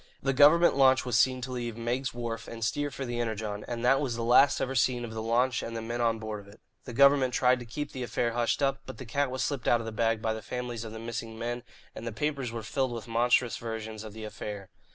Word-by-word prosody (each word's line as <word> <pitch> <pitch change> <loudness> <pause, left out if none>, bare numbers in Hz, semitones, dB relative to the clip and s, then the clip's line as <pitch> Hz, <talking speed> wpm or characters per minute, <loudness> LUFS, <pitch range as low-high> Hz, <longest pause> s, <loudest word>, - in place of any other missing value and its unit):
The 135 0 0
government 150 +6 +6
launch 130 -1 +5
was 125 - -1
seen 130 -1 +3
to 130 +1 -5
leave 120 -2 -4
Meigg's 120 +3 -1
Wharf 115 -1 -5
and 115 -1 -4
steer 145 +5 -1
for 135 -1 -5
the 120 -1 -3
Energon, 110 -3 -3
and 120 0 -3
that 135 +3 +4
was 130 -5 -1
the 115 - -3
last 125 +4 +5
ever 135 - -1
seen 125 -1 +1
of 110 - -8
the 110 - -4
launch 120 +3 +1
and 115 0 -5
the - - -3
men 120 +1 -3
on 115 -1 +2
board 110 -1 -5
of 100 - -14
it. 105 - -18 0.3
The 125 - -7
government 140 -1 +5
tried 125 0 +4
to 120 - -9
keep 145 +5 -5
the 130 - -6
affair 120 -1 -1
hushed 120 +4 0
up, 135 0 +1
but 130 - -8
the 130 - -8
cat 140 +4 0
was 130 0 -2
slipped 140 -6 -2
out 120 - +4
of 115 - -6
the 115 - -4
bag 115 0 +1
by 110 0 -1
the 110 - -6
families 125 -2 -5
of 110 - -7
the 110 - -7
missing 115 0 -5
men, 120 +1 -3 0.3
and 115 - -7
the - - -2
papers 135 +1 -2
were 115 -1 -5
filled 130 +2 -1
with 115 -1 -6
monstrous 120 +1 +2
versions 110 -1 -6
of 110 -2 -9
the 110 0 -8
affair. 105 -2 -6
120 Hz, 270 wpm, -29 LUFS, 115-130 Hz, 0.3 s, government